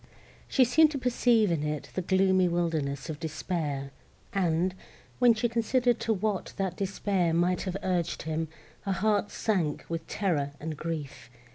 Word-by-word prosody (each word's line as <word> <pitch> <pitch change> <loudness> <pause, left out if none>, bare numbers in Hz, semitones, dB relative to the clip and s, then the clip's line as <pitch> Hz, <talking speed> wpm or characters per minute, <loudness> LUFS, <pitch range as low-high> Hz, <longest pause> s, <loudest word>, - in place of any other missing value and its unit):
She 260 - +4
seemed 310 +6 +5
to - - -1
perceive 240 -5 +3
in 165 -3 0
it 150 0 -3
the 185 - -1
gloomy 190 0 +3
wildness 160 -5 -1
of 155 -3 -5
despair; 155 -4 -3 0.4
and, 180 -1 +1 0.5
when 245 -2 +6
she 220 +2 +1
considered 240 +1 +1
to 225 - -1
what 210 -1 -1
that 190 -3 -1
despair 190 -3 0
might 180 +2 +2
have 185 - -2
urged 180 -3 -1
him, 160 +1 -2 0.3
her 195 - -1
heart 205 +2 +1
sunk 175 -9 -1
with 165 -1 -4
terror 150 -8 -1
and 155 0 -4
grief. 145 -7 -5
180 Hz, 155 wpm, -29 LUFS, 160-210 Hz, 0.5 s, when